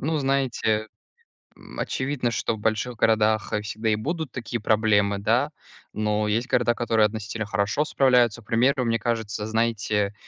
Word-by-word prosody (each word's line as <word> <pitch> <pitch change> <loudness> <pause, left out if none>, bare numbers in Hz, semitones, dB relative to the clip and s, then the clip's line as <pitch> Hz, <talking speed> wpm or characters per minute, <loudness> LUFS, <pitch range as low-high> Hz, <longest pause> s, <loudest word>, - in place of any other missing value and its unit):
Ну, 155 +2 -1
знаете, 125 -6 0 0.7
м, - - -13
очевидно, 130 -2 -1
что 115 - -1
в - - -8
больших 110 +3 -1
городах, 110 -1 +2
э, 105 - 0
всегда 110 +1 -3
и 105 - +3
будут 160 +4 -3
такие 120 -2 -4
проблемы, 105 -2 +2
да, 100 - +1 0.4
но 105 0 0
есть 115 +5 0
города, 120 -1 +2
которые 115 -3 +2
относительно 110 0 -5
хорошо 100 +8 0
справляются. 125 -6 +2
К - - -27
примеру, 125 +3 +2
мне 115 0 +1
кажется, 110 -2 -2
знаете, 110 -2 0
110 Hz, 160 wpm, -24 LUFS, 105-125 Hz, 0.7 s, и